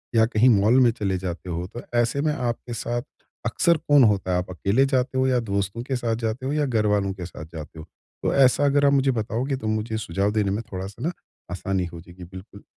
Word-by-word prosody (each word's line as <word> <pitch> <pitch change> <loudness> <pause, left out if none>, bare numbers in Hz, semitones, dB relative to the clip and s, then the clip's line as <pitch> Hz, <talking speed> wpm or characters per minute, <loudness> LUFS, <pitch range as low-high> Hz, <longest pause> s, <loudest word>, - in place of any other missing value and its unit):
या 110 - +6
कहीं 115 +2 +3
मॉल 110 +4 +4
में 120 - +5
चले 100 -5 -2
जाते 90 0 -5
हो 85 +1 -3
तो 120 +5 -8 0.2
ऐसे 120 +4 +1
में 155 0 +1
आपके 120 -2 -3
साथ 120 +2 -2 0.4
अक्सर 170 +7 +2
कौन 145 -3 +4
होता 100 -4 +2
है? 90 - +2
आप 90 +1 -3
अकेले 100 +8 +1
जाते 130 -1 0
हो 130 0 +2
या 125 -1 +2
दोस्तों 100 0 -2
के 135 0 -2
साथ 115 -2 -1
जाते 115 +4 -3
हो 140 - -1
या 150 -1 +1
घरवालों 105 -5 +1
के 90 -2 -7
साथ 80 -3 -9
जाते 80 0 -8
हो? 80 - -9 0.4
तो - - +1
ऐसा 135 +1 +4
अगर 145 0 +3
आप 140 - +4
मुझे 135 -1 +3
बताओगे 120 +4 -2
तो 110 - -5
मुझे 110 +1 -1
सुझाव 100 0 -1
देने 105 -2 0
में 105 +3 -1
थोड़ा-सा 95 - -5
न 175 - 0 0.4
आसानी 95 0 -2
हो 85 -1 -9
जाएगी, 90 +1 -13
बिल्कुल 95 +3 -12
110 Hz, 230 wpm, -24 LUFS, 95-130 Hz, 0.4 s, या